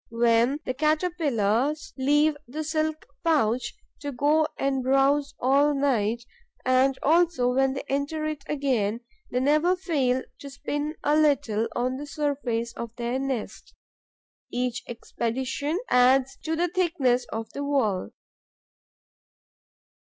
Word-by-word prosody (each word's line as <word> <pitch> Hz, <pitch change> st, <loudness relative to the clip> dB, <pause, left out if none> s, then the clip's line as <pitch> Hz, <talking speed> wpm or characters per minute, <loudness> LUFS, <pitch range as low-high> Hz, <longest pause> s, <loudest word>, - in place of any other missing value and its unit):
When 235 Hz, +4 st, +2 dB
the 255 Hz, -, -1 dB
caterpillars 300 Hz, -, 0 dB
leave 295 Hz, +3 st, +3 dB
the 305 Hz, +6 st, -4 dB
silk 310 Hz, 0 st, -2 dB, 0.2 s
pouch, 250 Hz, -7 st, +1 dB, 0.2 s
to 285 Hz, -, -4 dB
go 295 Hz, +4 st, +2 dB
and 270 Hz, -1 st, 0 dB
browse 275 Hz, +2 st, +2 dB
at 280 Hz, +3 st, +3 dB
night, 235 Hz, -5 st, +1 dB, 0.4 s
and 260 Hz, +1 st, +3 dB
also 320 Hz, -6 st, +3 dB
when 270 Hz, +1 st, +2 dB
they 270 Hz, -, -4 dB
enter 285 Hz, +3 st, -2 dB
it 305 Hz, -2 st, -4 dB
again, 245 Hz, -7 st, 0 dB, 0.3 s
they 250 Hz, -, 0 dB
never 305 Hz, +7 st, +3 dB
fail 275 Hz, -9 st, 0 dB, 0.2 s
to 280 Hz, -, -8 dB
spin 290 Hz, +2 st, -4 dB
a 295 Hz, -, +3 dB
little 245 Hz, -8 st, +2 dB
on 255 Hz, +2 st, -1 dB
the 290 Hz, +2 st, -7 dB
surface 265 Hz, -6 st, -2 dB
of 235 Hz, -1 st, -7 dB
their 240 Hz, +2 st, -2 dB
nest. 265 Hz, -4 st, -5 dB, 0.8 s
Each 245 Hz, -1 st, -2 dB
expedition 260 Hz, +6 st, -3 dB
adds 255 Hz, +1 st, +4 dB
to 320 Hz, 0 st, 0 dB
the 345 Hz, +2 st, +1 dB
thickness 320 Hz, -9 st, +1 dB
of 225 Hz, 0 st, -5 dB
the 285 Hz, -, -5 dB
wall. 245 Hz, -10 st, 0 dB
275 Hz, 125 wpm, -26 LUFS, 245-300 Hz, 0.8 s, adds